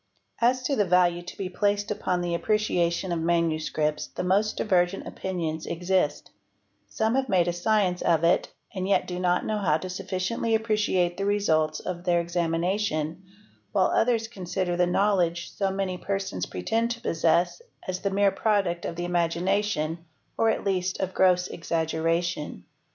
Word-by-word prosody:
As 250 +2 +2
to 275 +2 0
the 210 - +3
value 175 -1 +3
to 175 - -10
be 195 - -3
placed 205 +2 0
upon 180 -3 -1
the 175 -1 -2
appreciation 180 -2 0
of 170 - 0
manuscripts 160 -2 0
the - - -5
most 200 +4 +1
divergent 180 -2 +1
opinions 165 -4 -4
exist; 175 -3 0 0.6
some 220 - 0
have 265 -1 0
made 180 -2 +3
a 175 - +1
science 180 0 +1
of 165 -1 +2
it 170 +1 +2 0.2
and 190 -2 -3
yet - - +3
do 180 0 -5
not 180 0 +1
know 215 -1 -1
how 160 -6 +2
to 185 +3 -6
sufficiently 190 +4 -1
appreciate 210 -5 +1
the 195 - -1
results 160 -7 +1
of 175 -1 -5
their 175 -1 +2
examination, 170 0 -1 0.5
while 190 -3 +3
others 225 -1 +2
consider 185 -4 -3
the 180 0 +2
knowledge 175 -3 +1
so 195 -1 -1
many 190 -2 -2
persons 195 - -3
pretend 225 - -1
to 235 -1 -4
possess 170 -1 +1 0.3
as 185 0 -2
the 200 - -1
mere 200 0 +3
product 195 -4 0
of 165 - -4
the 175 +1 -3
imagination 175 -1 0 0.3
or 225 - +3
at - - 0
least 185 -2 -1
of 190 -1 -2
gross 180 -1 +3
exaggeration. 165 - -2
180 Hz, 160 wpm, -26 LUFS, 170-200 Hz, 0.6 s, the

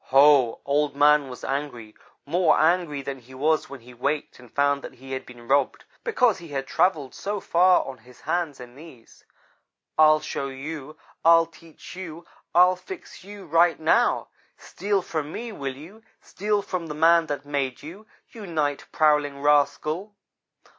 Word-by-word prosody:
Ho! 135 -3 +5
Old 145 0 0
man 145 -1 +4
was 125 - -10
angry 135 -6 -4 0.3
more 165 +2 +3
angry 160 -3 +1
than 135 0 -5
he 130 +2 -15
was 155 +4 +1
when 140 -3 -10
he 125 +2 -14
waked 140 +5 -3
and 125 -2 -16
found 140 0 +1
that - - -10
he 135 +2 -12
had 130 0 -5
been 120 -1 -13
robbed, 140 0 +1 0.2
because 250 - +2
he 170 - -11
had 135 -3 -4
travelled 155 -3 0
so 205 +1 -4
far 180 0 +3
on 130 -2 -8
his 125 +2 -19
hands 160 -2 -2
and 125 0 -11
knees. 140 -6 -15 0.8
"'I'll 155 0 +6
show 140 - -4
you. 145 +2 -7 0.3
I'll 165 0 +6
teach 165 0 -14
you. 170 -2 -8 0.3
I'll 180 +1 +6
fix 320 - -11
you, 200 0 -11
right 165 +1 +3
now. 155 - +2 0.3
Steal 200 0 -2
from 155 -3 -4
me, 235 +5 -6
will 135 -9 -5
you? 185 +10 -13 0.2
Steal 205 +1 -2
from 180 -4 -4
the 150 - -6
man 165 +1 +4
that 145 -1 -4
made 140 -3 -3
you, 195 +8 -11 0.2
you 215 -4 -9
night 150 -4 -2
prowling 150 -2 +2
rascal!' 150 +7 +1
150 Hz, 165 wpm, -24 LUFS, 140-170 Hz, 0.8 s, I'll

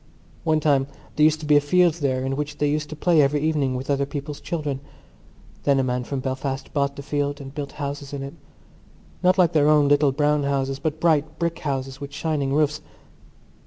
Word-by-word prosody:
One 155 -1 +2
time 140 -3 +2 0.3
there 150 - +3
used 155 0 +3
to - - -6
be 150 -1 +5
a - - +4
field 175 +3 +3
there 130 -2 0
in 135 0 -1
which 150 +1 -4
they 150 - +1
used 150 0 -1
to 155 - -6
play 165 +1 +3
every 145 +1 +2
evening 145 -4 +1
with 130 +1 -5
other 140 -1 0
people's 145 0 -6
children. 145 -3 -3 0.8
Then 140 -1 +3
a - - +2
man 125 -1 -1
from 135 0 -3
Belfast 135 +1 -4
bought 140 -1 0
the 140 - -8
field 145 0 -2
and 135 -1 -9
built 145 -2 -5
houses 140 -1 -5
in 140 -1 -5
it—not 140 - -5
like 175 -3 +4
their 150 -1 +4
little 145 -1 +4
brown 150 +1 +2
houses 135 -1 -1
but 155 -1 -2
bright 155 -2 +1
brick 170 0 -2
houses 135 -1 -3
with 140 0 -6
shining 145 -2 -1
roofs. 150 +1 +1
145 Hz, 200 wpm, -23 LUFS, 140-155 Hz, 0.8 s, be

